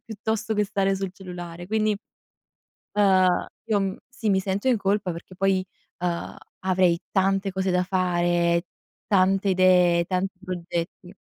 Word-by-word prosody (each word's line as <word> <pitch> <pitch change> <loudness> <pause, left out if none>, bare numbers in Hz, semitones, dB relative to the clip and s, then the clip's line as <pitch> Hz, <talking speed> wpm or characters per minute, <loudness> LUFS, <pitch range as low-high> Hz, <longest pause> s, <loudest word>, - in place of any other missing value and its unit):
piuttosto 220 0 -2
che 210 0 +2
stare 195 -1 0
sul 190 -1 -4
cellulare. 175 -2 -8
Quindi, 215 +1 +1 1.0
ehm, 190 -3 +4 0.2
io 210 -2 +2
m 195 -1 -2
sì, 235 -4 -3
mi 190 -1 +3
sento 195 +5 -2
in 250 - +4
colpa, 195 -1 0
perché 170 +2 -10
poi, 190 0 +1 0.3
ehm, 175 -1 -3 0.2
avrei 185 -2 +2
tante 195 0 +1
cose 190 0 -1
da 180 0 +2
fare, 175 -2 +1 0.4
tante 195 0 +3
idee, 180 -2 +4
tanti 185 +1 -2
progetti. 175 0 -5
190 Hz, 140 wpm, -25 LUFS, 180-195 Hz, 1.0 s, ehm